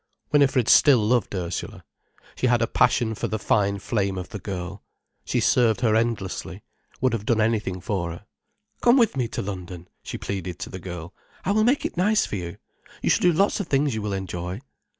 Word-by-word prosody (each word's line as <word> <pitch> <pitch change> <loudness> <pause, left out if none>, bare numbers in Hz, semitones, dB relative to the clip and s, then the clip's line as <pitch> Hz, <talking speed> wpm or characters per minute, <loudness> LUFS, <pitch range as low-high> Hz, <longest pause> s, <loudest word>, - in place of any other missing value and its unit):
Winifred 135 -5 +3
still 140 -4 +7
loved 110 -1 +1
Ursula. 90 -1 -5 0.5
She 130 - 0
had 120 -1 +3
a - - +4
passion 120 -1 +2
for - - -3
the 110 - -2
fine 100 -1 +1
flame 100 -2 -1
of 90 -1 -6
the 105 - -6
girl, 95 +1 -6 0.4
she - - 0
served 115 -5 +3
her 110 -3 +3
endlessly, 115 -4 -2 0.4
would 130 -1 +1
have 110 -3 -2
done 115 0 +1
anything 105 -4 0
for 90 -2 -2
her. 85 - -9 0.6
"Come 240 +2 +5
with 230 - +3
me 125 -3 0
to - - -4
London," 90 -3 -7
she - - -6
pleaded 90 -3 -4
to - - -7
the 95 - -6
girl. 90 0 -7 0.3
"I 195 - +1
will 215 +1 +3
make 260 +4 +2
it - - -4
nice 210 +4 +3
for - - -5
you,—you 85 -3 -7
shall - - +3
do 180 - +5
lots 195 +7 +2
of 200 - -3
things 140 -1 +1
you 110 - -3
will 105 -1 -3
enjoy." 90 0 -4
105 Hz, 200 wpm, -24 LUFS, 95-125 Hz, 0.6 s, still